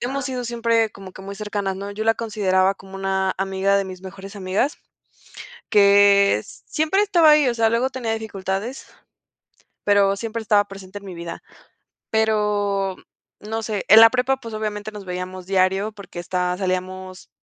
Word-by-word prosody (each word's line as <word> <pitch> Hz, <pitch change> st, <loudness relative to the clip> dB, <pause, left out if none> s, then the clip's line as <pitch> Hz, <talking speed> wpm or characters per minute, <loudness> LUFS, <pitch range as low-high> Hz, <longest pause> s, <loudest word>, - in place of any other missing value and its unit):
hemos 265 Hz, +2 st, -3 dB
sido 250 Hz, -2 st, -4 dB
siempre 230 Hz, -1 st, +1 dB
como 195 Hz, -2 st, -12 dB
que 190 Hz, -, -11 dB
muy 200 Hz, +1 st, -7 dB
cercanas, 205 Hz, -2 st, -3 dB
¿no? 200 Hz, +1 st, -6 dB
Yo 210 Hz, +2 st, -4 dB
la 225 Hz, 0 st, +4 dB
consideraba 195 Hz, -4 st, +1 dB
como 195 Hz, 0 st, -14 dB
una 190 Hz, 0 st, 0 dB
amiga 195 Hz, +1 st, +1 dB
de 195 Hz, -, -1 dB
mis 185 Hz, -1 st, -9 dB
mejores 195 Hz, +2 st, -10 dB
amigas, 195 Hz, +9 st, -1 dB, 0.9 s
que 200 Hz, -, +5 dB, 0.2 s
siempre 315 Hz, +6 st, +1 dB
estaba 345 Hz, -6 st, +5 dB
ahí, 300 Hz, -2 st, +5 dB
o 240 Hz, -, 0 dB
sea, 225 Hz, -1 st, +3 dB
luego 235 Hz, +3 st, +1 dB
tenía 250 Hz, -4 st, -3 dB
dificultades, 210 Hz, +2 st, -4 dB, 1.0 s
pero 200 Hz, -1 st, +3 dB
siempre 230 Hz, +2 st, -4 dB
estaba 205 Hz, -1 st, +3 dB
presente 195 Hz, 0 st, -10 dB
en 200 Hz, -, -10 dB
mi 190 Hz, -, -7 dB
vida. 170 Hz, -1 st, -7 dB, 0.7 s
Pero, 210 Hz, -3 st, +1 dB, 0.4 s
no 220 Hz, +2 st, -4 dB
sé, 215 Hz, -3 st, -3 dB
en 215 Hz, +3 st, +10 dB
la 225 Hz, 0 st, +10 dB
prepa, 255 Hz, +2 st, +1 dB
pues, 230 Hz, -4 st, -9 dB
obviamente 215 Hz, 0 st, -4 dB
nos 205 Hz, -1 st, -8 dB
veíamos 180 Hz, 0 st, -6 dB
diario 190 Hz, +2 st, +1 dB
porque 200 Hz, -4 st, -12 dB
esta 180 Hz, +1 st, -1 dB
salíamos, 185 Hz, 0 st, -4 dB
200 Hz, 165 wpm, -22 LUFS, 190-225 Hz, 1.0 s, en